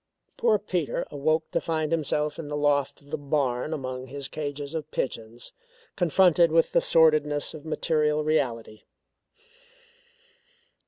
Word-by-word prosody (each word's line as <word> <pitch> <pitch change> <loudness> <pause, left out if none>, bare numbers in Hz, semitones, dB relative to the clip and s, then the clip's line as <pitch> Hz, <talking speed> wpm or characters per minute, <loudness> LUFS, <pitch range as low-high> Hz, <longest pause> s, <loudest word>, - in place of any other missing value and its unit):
Poor 225 -3 +3
Peter 180 -6 -2
awoke 155 +3 0
to - - 0
find 155 -2 -2
himself 150 -1 -1
in 160 - -6
the 145 0 -3
loft 145 -1 +1
of 145 +1 -19
the 155 - -2
barn 140 -1 -1
among 130 -4 -5
his 140 +1 -4
cages 145 -1 -5
of 155 -2 -4
pigeons, 115 -4 -5 0.4
confronted 175 -1 +4
with 165 0 +3
the - - +3
sordidness 155 -2 +3
of 155 -1 -10
material 150 -1 +1
reality. 125 -8 -1
150 Hz, 130 wpm, -26 LUFS, 140-160 Hz, 0.4 s, confronted